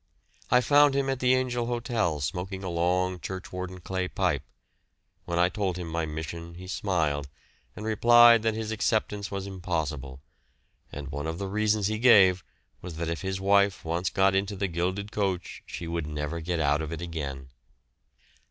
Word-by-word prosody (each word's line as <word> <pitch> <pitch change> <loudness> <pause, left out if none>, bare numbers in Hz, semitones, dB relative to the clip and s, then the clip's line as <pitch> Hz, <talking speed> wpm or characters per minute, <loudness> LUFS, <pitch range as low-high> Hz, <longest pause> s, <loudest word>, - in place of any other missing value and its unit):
I 125 +1 +5
found 145 +1 +5
him 135 -1 +1
at 135 - -3
the 130 0 +4
Angel 125 -2 -1
Hotel 115 - -1
smoking 90 +7 -4
a 95 - -3
long 90 +2 0
churchwarden 90 0 -6
clay 95 0 -2
pipe; 90 -8 0 0.8
when 85 - -2
I 90 +1 +5
told 95 -2 -2
him 90 -2 -5
my 80 0 -2
mission 85 +2 -6
he 90 +1 -9
smiled 80 -8 -1 0.5
and 105 - -7
replied 120 +1 +6
that 110 -1 0
his 110 0 -3
acceptance 105 -2 -1
was 100 -1 -4
impossible, 80 -8 -4 0.7
and 70 -1 -7
one 75 +2 -4
of 80 0 -3
the 100 - -4
reasons 105 +1 +1
he 110 +1 -1
gave 95 -7 +6 0.4
was 90 -3 -7
that 85 0 -2
if 85 - -3
his 95 0 -3
wife 100 -1 +2
once 85 +3 -1
got 95 0 +3
into 100 +1 0
the 100 0 -1
gilded 95 +4 -2
coach 95 -4 -2
she 85 - -6
would 85 -2 -3
never 75 +2 -3
get 85 +1 -2
out 75 0 +2
of 80 0 -5
it 85 +1 -5
again. 70 -6 -5
90 Hz, 175 wpm, -27 LUFS, 85-105 Hz, 0.8 s, replied